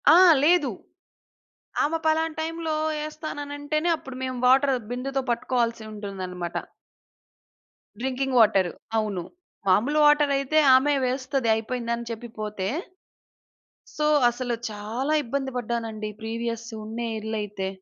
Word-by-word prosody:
ఆ! - - +8 0.3
లేదు. 320 -3 +4 1.1
ఆమె 320 +3 +1
పలానా 315 0 +2
టైంలో 325 0 -2 0.3
ఏస్తాననంటేనే 305 0 -3
అప్పుడు 265 -4 -10
మేము 255 -1 -3
వాటరు 265 +1 +5
బిందెతో 270 +2 -2
పట్టుకోవాల్సి 235 -1 0
ఉంటుందన్నమాట. 185 -4 -5 1.4
Drinking 265 +1 -1
water. 200 -5 +5 0.3
అవును. 205 -5 -1 0.4
మాములు 240 +11 +3
వాటరయితే 295 -1 +4 0.2
ఆమె 285 +3 +4
వేస్తది 260 -1 -1
అయిపోయింది 235 +1 -3
అని 235 0 -7
చెప్పి 230 +1 -6
పోతే 210 -3 -3 1.3
సో, 300 - +1 0.2
అసలు 245 0 -3 0.2
చాలా 225 +8 -2
ఇబ్బంది 270 +2 -2
పడ్డానండి 225 -3 -3
ప్రీవియస్ 230 +1 -3 0.2
ఉన్న 225 +2 -6 0.2
ఇల్లయితే. 210 -3 -3
250 Hz, 105 wpm, -25 LUFS, 220-290 Hz, 1.4 s, ఆ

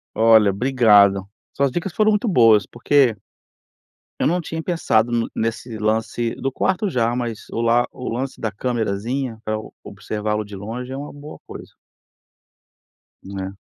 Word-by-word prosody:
Olha 110 -2 +5
obrigado. 100 -4 +4 0.3
Suas 140 -2 +1
dicas 175 +5 -3
foram 215 +3 +3
muito 210 +3 0
boas, 115 - +5
porque 125 -1 +2 1.1
eu - - +3
não 175 +4 +1
tinha 160 0 -5
pensado 120 -10 +1
n 115 -1 0
nesse 115 0 -3
lance, 110 +2 -1
do 135 - -3
quarto 190 +8 0
já, 120 -6 0
mas 120 -3 -4
o 115 - -2
lá 120 +1 +3
o 125 - -6
lance 130 +3 -4
da 110 - -2
camerazinha 115 +2 -2
pra 110 0 -2
eu 110 - -8
observá-lo 105 0 -3
de 100 -1 -10
longe 120 +6 -6
é 135 - -4
uma 145 +1 -7
boa 145 +1 -11
coisa. - - -10 1.5
Né? 95 0 -6
115 Hz, 155 wpm, -21 LUFS, 110-135 Hz, 1.5 s, Olha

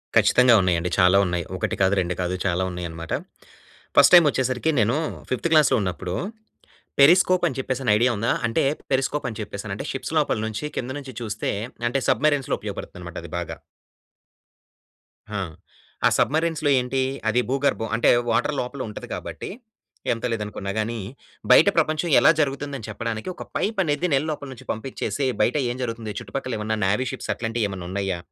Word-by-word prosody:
ఖచ్చితంగా 125 -1 +6
ఉన్నాయండి. 90 -1 +1
చాలా 90 +1 +6
ఉన్నాయి. 90 -2 -2
ఒకటి - - -1
కాదు 95 +1 +4
రెండు 90 0 -2
కాదు 90 +1 -1
చాలా 90 0 +1
ఉన్నాయి 90 -1 -4
అన్నమాట. 80 0 -6 0.8
ఫస్ట్ 145 +4 +7
టైమ్ 175 -2 +8
వచ్చేసరికి 130 +2 0
నేను 115 +6 +2 0.3
ఫిఫ్త్ 130 +6 0
క్లాస్‌లో 150 -4 +5
ఉన్నప్పుడు 90 -1 -3 0.8
పెరిస్కోప్ 180 +5 +6
అని 135 - -4
చెప్పేసి 130 0 -2
ఐడియా 120 +3 +3
ఉందా? 115 +3 +1
అంటే 115 - +1 0.3
పెరిస్కోప్ 135 +2 0
అని 110 - -8
చెప్పేసానంటే - - -5
షిప్స్ - - -5
లోపల - - 0
నుంచి 110 +5 -4
కిందనుంచి 130 +1 -5
చూస్తే 110 -3 -2 0.4
అంటే 135 +2 -1
సబ్‌మరైన్‌లో 145 +2 +2
ఉపయోగపడుతుంది - - -7
అన్నమాట 85 0 -8
అది 85 - -9
బాగా. 85 - -5 1.7
హా! 105 -2 -3 0.7
ఆ - - +5
సబ్‌మరిన్స్‌లో 160 0 +1
ఏంటి 125 +1 -1 0.3
అది 115 +3 +2
భూగర్భం 135 -4 0
అంటే 115 - +3 0.2
వాటర్ 115 +6 +1
లోపల 130 +2 -4
ఉంటది 105 - -8
కాబట్టి, - - -6 0.6
ఎంత 115 - -7
లేదనుకున్నాగాని 105 +1 -3 0.5
బయట - - +8
ప్రపంచం 155 +2 +1
ఎలా - - +7
జరుగుతుందని 140 -4 -2
చెప్పడానికి 110 - -4
ఒక - - -7
పైప్ 215 0 -1
అనేది 160 +2 0
నీళ్ళ 140 +3 +2
లోపల 145 -1 -5
నుంచి 125 - -14
పంపించేసి 135 +4 -3 0.2
బయట 120 +7 +2
ఏం 120 - -5
జరుగుతుంది 115 -3 -4
చుట్టుపక్కల 130 -3 -4
ఏమన్నా 110 +1 -2
నేవీ 105 +7 +1
షిప్స్ 130 - -4
అట్లాంటివి 115 -1 -1
ఏమన్నా 95 -3 -6
ఉన్నాయా, 95 -2 -1
120 Hz, 155 wpm, -24 LUFS, 100-140 Hz, 1.7 s, టైమ్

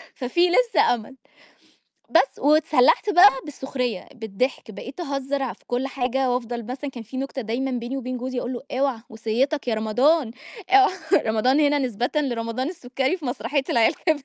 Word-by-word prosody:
ففيه 345 +8 +1
لسه 470 - +3
أمل، 240 +3 -9 0.9
بس - - +2
واتسلحت 300 +3 +3
بقى 395 +1 +8
بالسخرية 265 -7 -4
بالضحك، 225 +1 -3
بقيت 260 - -9
أهزّر 275 -4 -2
في - - -24
كل 245 +2 -1
حاجة 265 0 -1
وأفضَل 240 -1 -3
مثلًا 265 +3 -5
كان 240 -3 -8
فيه 245 +4 -9
نكتة 270 0 -4
دايمًا 245 +4 -2
بيني 245 +2 -3
وبين 255 -1 -4
جوزي 255 +1 -3
أقول 245 - -4
له: 240 - -5 0.2
"اوعى 270 -4 +1
وصيتك 240 +7 -1
يا 230 - +1
رمضان،" 245 +6 +2 0.4
آه، 395 +1 +7 0.4
رمضان 225 +6 +2
هنا 290 -1 +3
نسبةً 245 -2 -2
لرمضان 255 -2 -1
السكري 270 -1 -2
في 320 - -9
مسرحية 265 +2 -1
العيال 230 -2 +3
كبرت. 310 -5 -1
260 Hz, 160 wpm, -23 LUFS, 240-285 Hz, 0.9 s, بقى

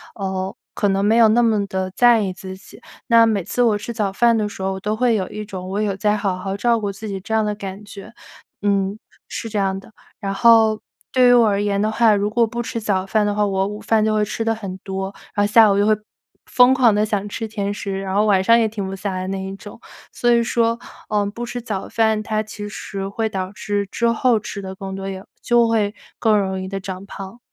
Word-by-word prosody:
呃， 190 0 -3 0.2
可 205 - 0
能 195 0 +1
没 215 +3 +3
有 230 -1 +7
那 230 +3 +4
么 215 -3 +2
地 190 -1 -3
在 240 -2 +6
意 195 - -1
自 190 0 -8
己。 190 - -15 0.3
那 230 -2 +6
每 210 -4 0
次 245 - -2
我 225 -3 +3
吃 210 +3 -6
早 210 -4 -1
饭 235 +2 +3
的 210 -1 0
时 200 - -9
候， 190 0 -1
我 190 - -4
都 210 +2 -2
会 240 0 +2
有 190 -3 -1
一 210 - -6
种 185 -3 -7
“我 200 +2 -1
有 200 -2 -1
在 210 +1 +1
好 200 -3 -1
好 195 +1 -4
照 230 +3 +2
顾 205 -2 -3
自 210 +2 -7
己” 195 - -4
这 215 +4 -6
样 220 - +3
的 210 0 -1
感 200 0 -7
觉， 205 +2 -11 0.5
嗯， 200 0 0 0.3
是 225 - -5
这 210 - -2
样 195 0 0
的。 195 - -16 0.3
然 195 -2 -3
后 220 0 +5 0.3
对 255 -1 +5
于 245 - +7
我 235 -2 +6
而 200 0 +1
言 200 -1 0
的 215 +1 +1
话， 220 -1 +4
如 205 +1 0
果 230 +2 +2
不 235 +2 -4
吃 230 - -4
早 190 -3 0
饭 210 +2 +1
的 205 0 0
话， 210 0 +2
我 195 -1 0
午 210 +1 -6
饭 220 0 +2
就 215 0 +1
会 215 0 +2
吃 220 +2 -3
得 225 - +1
很 195 -4 -6
多， 190 0 -5 0.2
然 205 0 +2
后 205 - -3
下 220 -2 +7
午 195 - +2
就 205 - +3
会 215 0 +4 0.5
疯 250 +1 +5
狂 245 -4 +4
地 210 - +2
想 205 -1 -2
吃 225 +2 -4
甜 205 -2 -3
食， 195 -1 -4
然 190 0 -3
后 210 +1 +3
晚 195 -3 +3
上 230 +4 +6
也 225 - +2
停 210 -2 -5
不 195 - -5
下 195 +1 -4
来 185 0 -4
那 190 0 -3
一 190 0 -6
种。 205 +2 -12 0.3
所 240 - +1
以 235 0 +4
说， 230 0 +1 0.3
呃， 210 -1 +1
不 235 +4 -5
吃 245 0 -5
早 210 -5 -4
饭， 220 -1 +1
它 215 0 -1
其 210 -1 -7
实 195 -1 -5
会 220 +3 -2
导 190 -2 -4
致 205 -1 -3
之 235 - 0
后 230 0 +2
吃 200 -1 -7
得 190 0 -6
更 195 -1 -6
多， 195 0 -5
也 190 0 -6 0.2
就 240 -1 +3
会 215 -3 +1 0.3
更 220 -2 +3
容 190 -1 -2
易 185 - -5
地 195 +1 -4
长 190 0 -7
胖。 195 +3 -9
205 Hz, 275 characters per minute, -20 LUFS, 195-225 Hz, 0.5 s, 有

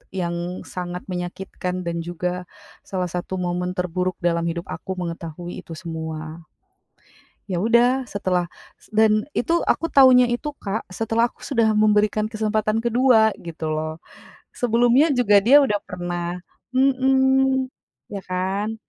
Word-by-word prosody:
yang 175 0 -3
sangat 180 0 -6
menyakitkan, 180 0 -4
dan 170 0 -2
juga 180 +1 -4 0.4
salah 185 -2 -2
satu 180 +2 -4
momen 180 0 -2
terburuk, 180 0 -1
dalam 170 -1 +1
hidup 170 +1 -4
aku, 190 - -5
mengetahui 170 0 -6
itu 165 - -9
semua. 160 -2 -6 1.1
Ya 180 -3 -2
udah, 245 +3 +3
setelah 180 -4 -1 0.3
s - - -21
dan 215 -1 +4
itu, 335 +6 +1
aku 330 - +1
taunya 255 -2 +7
itu, 295 +5 -2
Kak, 205 +2 -3
setelah 225 +4 +1
aku - - -35
sudah 230 -5 +1
memberikan 210 0 +3
kesempatan 215 0 0
kedua, 235 -2 +4
gitu 165 -2 -5
loh. 155 +1 -4 0.5
Sebelumnya 245 +5 +3
juga, 205 -4 +5
dia 255 +8 +7
udah 210 -4 +1
pernah 175 0 -4 0.4
mhm, 265 0 +3 0.5
iya 200 - -4
kan. 195 +4 -2
190 Hz, 130 wpm, -22 LUFS, 175-235 Hz, 1.1 s, taunya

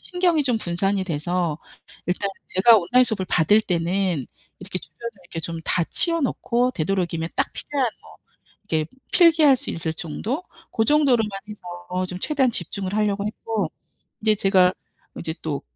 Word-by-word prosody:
신경이 355 -4 +1
좀 245 -4 +1
분산이 195 +1 0
돼서 170 -1 -1 0.5
일단 190 +3 0 0.2
제가 225 +5 +6
온라인 245 +8 +4
수업을 215 -6 0
받을 205 +6 +4
때는 175 -4 0 0.3
이렇게 185 0 -4
주변에 235 +4 -8
이렇게 175 -2 -6
좀 165 0 -4
다 175 - +1
치워 335 - 0
놓고 250 -2 +1
되도록이면 170 -2 -1
딱 - - 0
필요한 275 -4 -1
뭐 - - -16 0.5
이렇게 155 -1 +1 0.3
필기할 320 -6 +6
수 - - -3
있을 165 -1 -2
정도? 210 - -4 0.3
고 225 - +1
정도로만 260 -6 +3 0.2
해서 180 -2 -5
좀 180 0 -6
최대한 270 +3 +1
집중을 190 -1 -4
하려고 205 -1 +1
했고. 210 -4 -2 0.5
이제 215 0 +3
제가 190 -2 +4 0.5
이제 160 -1 -3
또 150 -3 -3
195 Hz, 325 characters per minute, -23 LUFS, 175-240 Hz, 0.5 s, 제가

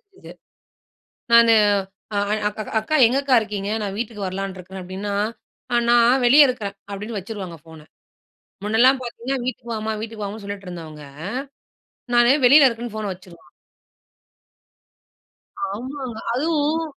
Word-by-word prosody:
தெரிஞ்சது. 400 -1 -15 1.0
நானு 230 -1 +7 0.6
அ - - +1 0.3
அக்கா 215 +1 -6 0.2
அக்கா 310 +8 -2
எங்க 255 +3 0
அக்கா 270 -2 +3
இருக்கீங்க? 205 -2 -4
நான் 200 -1 -4
வீட்டுக்கு 215 -3 -4
வரலான்னு 190 0 -4
இருக்கறேன் 185 +1 -9
அப்படின்னா, 195 +3 -5 0.8
"நான் 240 +2 +4
வெளியே 285 +4 +8
இருக்கறேன்" 210 -6 -4 0.2
அப்படின்னு 210 +2 -5
வச்சுருவாங்க 190 -4 -7
ஃபோனை. 160 -2 -14 0.8
முன்னலாம் 250 +5 +4
பார்த்தீங்கன்னா 245 +2 -4
வீட்டுக்கு 240 -2 -4
வாம்மா, 220 0 -3
வீட்டுக்கு 220 -1 -6
வாமான்னு 205 +1 -6
சொல்லிட்டு 200 -2 -7
இருந்தவங்க, 155 -4 -9 1.1
நானு 240 +2 +6
வெளியில 280 +2 +8
இருக்கேன்னு 230 -2 -4
ஃபோனை 215 -2 -3
வச்சுரும். 180 -2 -16 2.3
ஆமாங்க. 255 +1 -6 0.2
அதுவும் 310 +2 0
220 Hz, 120 wpm, -22 LUFS, 195-250 Hz, 2.3 s, வெளியே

